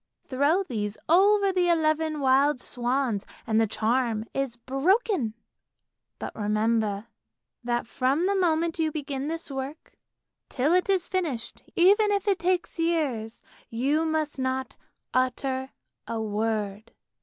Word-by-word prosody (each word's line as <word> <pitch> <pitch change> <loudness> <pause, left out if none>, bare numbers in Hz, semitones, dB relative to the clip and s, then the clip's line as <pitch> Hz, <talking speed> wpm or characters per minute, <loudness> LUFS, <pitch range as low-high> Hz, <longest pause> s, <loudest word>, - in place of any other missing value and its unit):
Throw 285 +8 +2
these 210 - -3
over 395 +4 +5
the 360 -1 +2
eleven 310 -2 +1
wild 270 +1 +3
swans 245 -4 -1 0.2
and 220 -1 +2
the 225 - +2
charm 225 0 0
is 270 -3 -2
broken! 270 - +1 0.8
But - - -6
remember 215 0 0 0.6
that 240 0 -1
from 270 +8 0
the 395 - +2
moment 335 -3 +1
you 315 -1 +1
begin 280 -2 -4
this 325 -1 -4
work, 270 +3 -6 0.6
till 285 +5 +1
it 365 +2 +2
is 375 -3 +2
finished, 320 -13 -3
even 405 +4 +5
if 405 0 0
it 390 -2 +2
takes 360 -1 -1
years, 285 -10 -1 0.3
you 275 +7 +1
must 315 -3 -1
not 260 0 -2 0.4
utter 260 +1 0 0.4
a 230 - -3
word! 215 0 -2
275 Hz, 130 wpm, -26 LUFS, 230-335 Hz, 0.8 s, over